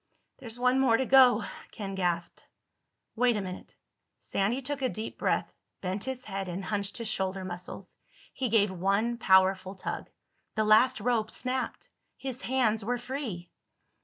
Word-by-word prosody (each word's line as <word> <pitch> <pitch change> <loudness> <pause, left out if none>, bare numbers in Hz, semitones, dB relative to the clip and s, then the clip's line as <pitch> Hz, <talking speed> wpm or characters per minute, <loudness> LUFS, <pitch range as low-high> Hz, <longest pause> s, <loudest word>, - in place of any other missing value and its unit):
"There's 235 -3 -8
one 250 +1 +3
more 245 -4 +4
to 265 - 0
go," 250 -4 +6 0.3
Ken 195 -2 -6
gasped. 175 -3 -2 0.7
"Wait 245 -1 +3
a - - -1
minute." 185 -1 -8 0.4
Sandy 205 +6 0
took 285 +1 -3
a 260 - +1
deep 220 0 -6
breath, - - 0 0.3
bent 190 +2 -3
his 260 -1 -4
head, 195 -2 -4
and 185 +2 -4
hunched 200 -1 -2
his 230 - -4
shoulder 190 -2 -2
muscles. 180 0 -7 0.4
He 260 -2 -1
gave 210 -3 +3
one 200 +6 0
powerful 190 0 +4
tug. 185 - -5 0.5
The 215 - +2
last 220 +4 +5
rope 225 -1 +1
snapped. 255 +2 -2 0.3
His 260 -1 -5
hands 230 -4 +1
were 245 +4 0
free. 240 -9 -5
215 Hz, 155 wpm, -29 LUFS, 195-250 Hz, 0.7 s, go